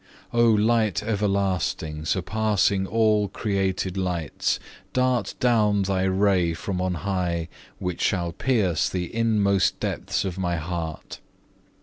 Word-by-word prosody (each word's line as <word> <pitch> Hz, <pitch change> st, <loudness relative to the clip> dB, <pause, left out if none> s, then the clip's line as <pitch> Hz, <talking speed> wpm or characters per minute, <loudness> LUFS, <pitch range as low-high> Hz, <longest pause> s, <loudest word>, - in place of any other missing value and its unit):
3. 120 Hz, -, -1 dB
O -, -, +6 dB
Light 110 Hz, -2 st, +2 dB
everlasting, 100 Hz, -7 st, -1 dB
surpassing 100 Hz, +1 st, +1 dB
all 110 Hz, -1 st, +2 dB
created 95 Hz, -2 st, -1 dB
lights, 90 Hz, -5 st, -1 dB, 0.3 s
dart 130 Hz, -1 st, +1 dB
down 105 Hz, -5 st, +3 dB
Thy 95 Hz, -1 st, 0 dB
ray 95 Hz, -3 st, +2 dB
from 90 Hz, +1 st, -3 dB
on 90 Hz, -1 st, 0 dB
high 90 Hz, -4 st, -1 dB, 0.3 s
which 90 Hz, -2 st, -4 dB
shall 85 Hz, -4 st, +1 dB
pierce 100 Hz, -, +1 dB
the 90 Hz, -2 st, -4 dB
inmost 105 Hz, -4 st, +2 dB
depths -, -, -2 dB
of 95 Hz, -1 st, -4 dB
my 90 Hz, -2 st, 0 dB
heart. 80 Hz, -1 st, -5 dB
95 Hz, 120 wpm, -24 LUFS, 90-105 Hz, 0.3 s, O